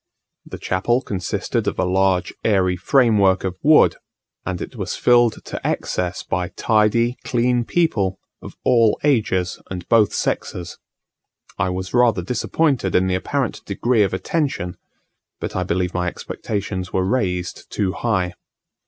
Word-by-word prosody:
The - - -7
chapel 120 +8 0
consisted 95 -3 -2
of - - -1
a - - +1
large 95 0 +1
airy 95 -4 +2
framework 100 -2 +3
of 95 -1 -4
wood; 155 +1 +5 0.5
and 90 -1 -2
it - - -7
was - - -4
filled 120 -2 +3
to - - -6
excess 90 -1 -2
by 90 -1 -2
tidy, 115 +2 +2
clean 120 -1 +1
people, 105 - +1 0.2
of - - -10
all 115 -3 +3
ages 105 -10 +1
and 90 -2 -6
both 110 -3 +4
sexes. 90 -1 -3 0.8
I 95 - +1
was 90 0 -4
rather 120 -7 +3
disappointed 125 - 0
in 90 - +4
the 95 - 0
apparent 130 +7 -2
degree 115 +3 +1
of 100 -2 +2
attention; 115 - -2 0.6
but - - -5
I 95 - 0
believe 90 0 -1
my 90 0 -1
expectations 95 0 -4
were 95 -1 0
raised 90 - -2
too 95 -3 0
high. 95 -5 -1
95 Hz, 145 wpm, -21 LUFS, 90-120 Hz, 0.8 s, wood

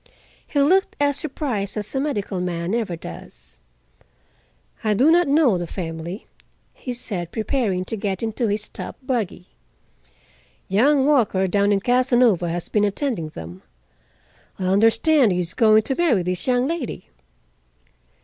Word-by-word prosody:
He 290 - -1
looked 370 +8 +3
as 285 -1 +2
surprised 250 - -3
as 210 0 -4
a 265 - 0
medical 205 -10 -2
man 175 +1 -3
ever 225 -7 -1
does. 165 - -11 1.2
"I 215 -1 +1
do 275 +9 +4
not 345 0 +4
know 275 - +3
the 175 - -4
family," 165 +2 -6 0.5
he 255 - -7
said, 195 -8 -4
preparing 215 -5 -1
to 225 - -4
get 195 -1 -3
into 225 +1 -1
his 210 +1 -2
top - - -7
buggy. 230 -9 -3 1.2
"Young 265 +8 +3
Walker, 235 -10 +2
down 200 +2 +2
in 200 -1 +2
Casanova, 245 -7 +3
has 170 0 -3
been 210 - +1
attending 205 - -1
them. 85 - -10 1.0
I 190 - -5
understand 225 - +4
he - - -1
is 175 -1 -2
going 220 -2 +4
to 270 - -1
marry 265 - +2
this 180 +4 -3
young 250 0 +2
lady." 320 -4 -4
215 Hz, 145 wpm, -22 LUFS, 185-265 Hz, 1.2 s, do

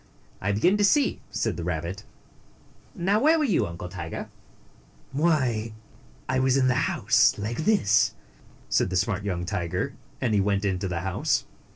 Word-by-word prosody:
I 100 - 0
begin 175 - +3
to 205 - +1
see," 280 +7 +3
said - - -2
the 85 - -4
rabbit. 90 +4 -4 0.9
"Now, 195 +5 +1
where 310 +6 +4
were 305 - +1
you, 210 - +1
Uncle 85 +1 -7
Tiger?" 85 -3 -6 0.8
"Why, 130 -7 +1 0.5
I 130 - +1
was 130 0 +3
inside 130 -1 +3
the - - +3 0.2
house, - - +3
like 115 +9 -3
this," 105 - +3 0.5
said - - +1
the 95 - -3
smart 95 +1 0
young 90 -3 -2
tiger, 90 -3 -2 0.3
and 120 -4 0
he 100 - +3
went 100 0 0
into 95 0 -1
the 90 -2 -3
house. 95 0 0
105 Hz, 165 wpm, -26 LUFS, 95-135 Hz, 0.9 s, where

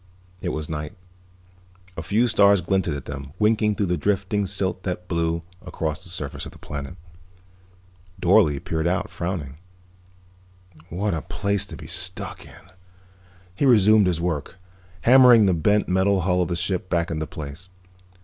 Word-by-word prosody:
It 90 - -2
was 75 -2 -4
night. 75 -1 -5 1.0
A 80 - -5
few 110 +8 +1
stars 100 -3 +4
glinted 95 -3 0
above 70 - -6
them, 70 0 -7
winking 105 0 +2
through 100 - 0
the 90 -1 0
drifting 100 +3 0
silt 95 -1 -1
that 90 -1 -4
blew 85 -1 -1 0.2
across 80 +2 -4
the 90 - -7
surface 75 -5 -3
of - - -10
the - - -14
planet. 70 +2 -7 1.2
Dorle 85 -6 +4
peered 80 +1 -1
out, 100 +3 -1
frowning. 85 -6 -5 1.3
"What 100 +4 -1
a 80 - -2
place 100 +2 -2
to - - -9
be - - -10
stuck - - -5
in." 90 - -17 0.8
He 135 +9 +1
resumed 110 -4 +5
his 85 -3 0
work, 85 -1 -3 0.5
hammering 125 -3 +7
the 95 - +3
bent 105 +6 +2
metal 95 +1 +2
hull 90 0 +1
of 90 - 0
the 85 - -2
ship 90 +1 -2
back 85 -1 0
into 80 -1 -3
place. 80 +5 -9
90 Hz, 160 wpm, -23 LUFS, 80-100 Hz, 1.3 s, hammering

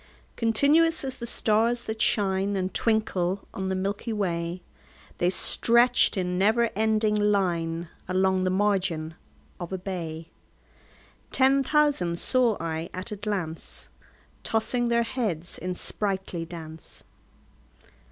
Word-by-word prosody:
Continuous 290 +9 +3
as 265 -1 -3
the 235 - -5
stars 230 +2 +2
that 220 0 -4
shine 195 -1 +1
And 190 -1 -2
twinkle 195 -4 0
on 190 -1 -3
the 190 - -1
milky 200 +5 -3
way, 175 -4 -2 0.6
They 175 - +2
stretched 235 +5 +4
in 180 -1 -1
never 225 +4 +2
ending 215 0 +1
line 175 -5 0 0.2
Along 190 0 +1
the 185 - +1
margin 185 -5 0 0.5
of 175 -1 -6
a 190 - -2
bay: 170 -4 -6 1.0
10 270 +1 +4
Ten 270 - -6
thousand 290 - +2
saw 245 +1 +2
I 165 0 -4
at 185 +5 -5
a - - -3
glance, 195 -6 -5 0.5
Tossing 240 +2 0
their 235 0 +2
heads 210 -9 -3
in 180 0 -4
sprightly 190 -4 -2
dance. 160 -2 -11
195 Hz, 125 wpm, -26 LUFS, 180-225 Hz, 1.0 s, stretched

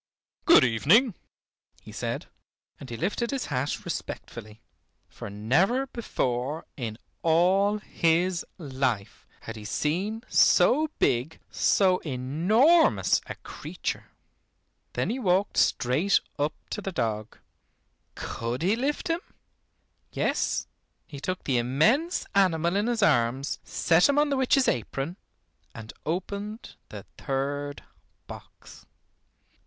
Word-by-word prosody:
"Good - - +7
evening," 165 - +4 0.7
he - - -11
said, - - -4 0.5
and 135 - -10
he 115 - -5
lifted 235 - -1
his 275 -2 -2
hat 130 +3 -2
respectfully, 110 +1 -6 0.5
for - - -9
never 160 - +1
before 140 - -3
in 115 -5 -5 0.2
all 185 +5 +3
his 175 -2 +1
life, 130 - -3
had 115 - -7
he 110 - -9
seen 185 - -2
so 310 +4 +4
big, 125 +7 0
so 185 -2 +3
enormous 175 - +3
a - - -6
creature. - - -5 0.9
Then - - -1
he 255 - -3
walked 195 -2 +1
straight 145 +11 +3 0.2
up 145 +2 0 0.2
to 210 - -3
the 195 - -4
dog. 110 - -3 0.8
Could 120 +5 -4
he 195 +5 +3
lift 275 +5 -2
him? 335 +1 0 0.9
Yes, - - 0 0.4
he 145 -3 -9
took 185 +6 -4
the 130 -3 +1
immense 215 - +2
animal 175 -3 +2
in 205 +3 +1
his 235 -3 0
arms, 130 - +1
set 175 - +3
him 285 - +2
on 295 0 +3
the 275 - +1
witch's 265 0 +3
apron, 135 - -2 0.6
and 110 -1 -9
opened 200 +6 -4 0.2
the - - -8 0.2
third 145 +1 -3 0.4
box. - - -13
165 Hz, 115 wpm, -27 LUFS, 130-210 Hz, 0.9 s, Good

